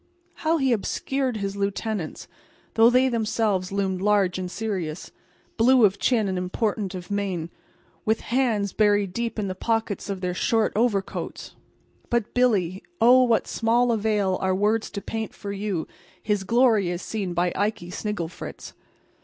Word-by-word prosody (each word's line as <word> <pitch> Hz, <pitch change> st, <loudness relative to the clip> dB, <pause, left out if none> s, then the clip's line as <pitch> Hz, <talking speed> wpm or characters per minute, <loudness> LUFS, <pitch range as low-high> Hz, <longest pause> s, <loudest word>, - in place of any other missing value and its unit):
How 325 Hz, +1 st, +1 dB
he 265 Hz, -4 st, +2 dB
obscured 255 Hz, +3 st, -1 dB
his 200 Hz, -1 st, -3 dB
lieutenants, 200 Hz, -2 st, -3 dB, 0.5 s
though 225 Hz, +1 st, +6 dB
they 255 Hz, +2 st, +4 dB
themselves 215 Hz, -5 st, 0 dB
loomed 190 Hz, -2 st, -1 dB
large 200 Hz, -3 st, +2 dB
and 180 Hz, -1 st, -4 dB
serious, 185 Hz, -7 st, -4 dB, 0.5 s
blue 245 Hz, 0 st, +6 dB
of 195 Hz, -1 st, +1 dB
chin 225 Hz, -5 st, +2 dB
and 185 Hz, -1 st, -1 dB
important 195 Hz, +1 st, -2 dB
of 180 Hz, +2 st, -8 dB
mien, 185 Hz, -5 st, -2 dB, 0.5 s
with 220 Hz, +1 st, +1 dB
hands 230 Hz, -6 st, 0 dB
buried 205 Hz, -3 st, +2 dB
deep 235 Hz, +1 st, -3 dB
in 210 Hz, -2 st, -1 dB
the 185 Hz, -, -2 dB
pockets 225 Hz, 0 st, -2 dB
of 195 Hz, -2 st, -3 dB
their 180 Hz, -1 st, -1 dB
short 225 Hz, +4 st, +1 dB
overcoats! 210 Hz, -4 st, -1 dB, 0.6 s
But 235 Hz, -3 st, 0 dB
Billy—oh, 245 Hz, -, +3 dB
what 235 Hz, -3 st, +3 dB
small 235 Hz, +2 st, +2 dB
avail 210 Hz, -4 st, +1 dB
are 190 Hz, 0 st, +1 dB
words 215 Hz, +3 st, +1 dB
to 200 Hz, -, -6 dB
paint 225 Hz, -1 st, -4 dB
for 200 Hz, -, -6 dB
you 200 Hz, -4 st, -3 dB, 0.4 s
his 205 Hz, -2 st, 0 dB
glory 230 Hz, -4 st, +3 dB
as 175 Hz, 0 st, -4 dB
seen 195 Hz, -5 st, -3 dB
by 175 Hz, 0 st, +1 dB
Ikey 205 Hz, -4 st, -2 dB
Snigglefritz! 185 Hz, -4 st, -5 dB
210 Hz, 150 wpm, -25 LUFS, 190-230 Hz, 0.6 s, though